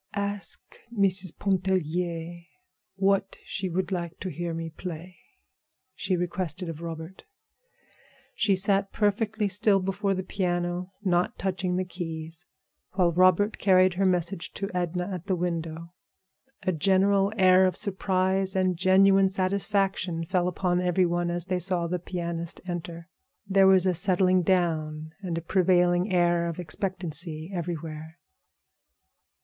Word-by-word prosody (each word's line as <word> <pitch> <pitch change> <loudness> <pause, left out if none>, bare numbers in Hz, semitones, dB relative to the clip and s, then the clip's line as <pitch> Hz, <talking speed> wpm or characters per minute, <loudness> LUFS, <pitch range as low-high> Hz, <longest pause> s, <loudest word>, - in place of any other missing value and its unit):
"Ask 200 0 -3
Mrs. 190 -5 0
Pontellier 175 -3 -1 0.5
what 195 0 +1
she 190 -1 -3
would 185 +2 -2
like 175 -2 -4
to 185 - -3
hear 170 0 -4
me 165 0 -5
play," 175 +1 -8 0.7
she 185 -1 -1
requested 175 -1 -3
of 165 0 -7
Robert. 165 +2 -7 1.1
She 205 -3 +2
sat 195 +1 +1
perfectly 210 +1 0
still 200 +1 +2
before 195 +1 -1
the 185 - -3
piano, 180 -1 -2
not 180 -2 +1
touching 185 -1 -2
the 185 0 -1
keys, 165 -2 -7 0.5
while 180 -2 +2
Robert 185 +4 +3
carried 185 -1 +4
her 195 +2 0
message 180 -1 -1
to 195 - -4
Edna 180 0 -2
at 180 0 -6
the 190 - +1
window. 170 -1 -4 0.7
A 185 - +1
general 195 +4 +3
air 185 -1 +6
of 185 - -2
surprise 190 -1 0
and 185 -2 +1
genuine 195 +1 +5
satisfaction 190 -2 0
fell 180 0 0
upon 180 0 0
every 180 +1 +2
one 175 0 0
as 175 0 -2
they 185 -1 -1
saw 180 -1 +1
the 180 +1 -2
pianist 170 -1 -4
enter. 170 -1 -6 0.4
There 195 0 +5
was 190 -1 +6
a 185 - +3
settling 185 +1 +3
down, 155 -4 0
and 175 -4 -3
a - - -2
prevailing 180 +1 +2
air 175 -1 +2
of 170 - -6
expectancy 170 -2 -4
everywhere. 160 -2 -5
180 Hz, 135 wpm, -27 LUFS, 170-190 Hz, 1.1 s, air